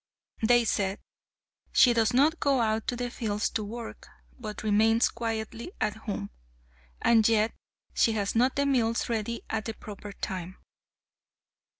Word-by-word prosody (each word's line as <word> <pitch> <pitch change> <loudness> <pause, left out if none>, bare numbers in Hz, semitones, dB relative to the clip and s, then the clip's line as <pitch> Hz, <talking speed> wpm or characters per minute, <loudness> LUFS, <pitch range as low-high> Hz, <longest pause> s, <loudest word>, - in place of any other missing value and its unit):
They 240 +1 +4
said, 195 -2 0 0.8
"She 245 - +6
does 225 -2 +2
not 295 +6 +3
go 275 -2 +2
out 220 -1 0
to 245 - 0
the 245 0 -3
fields 210 -3 -2
to 220 - -2
work, 230 +3 -8 0.3
but 215 -3 -6
remains 220 +2 +3
quietly 225 - -4
at 210 -1 0
home, 205 - -5 0.7
and 225 -2 +4
yet 220 0 +2 0.4
she 225 - +3
has 200 -2 -1
not 250 +3 +2
the 280 - +1
meals 235 -5 +1
ready 230 0 -2
at 220 -1 -3
the 225 - -4
proper 205 -1 -9
time." 185 -2 -5
225 Hz, 150 wpm, -28 LUFS, 210-240 Hz, 0.8 s, She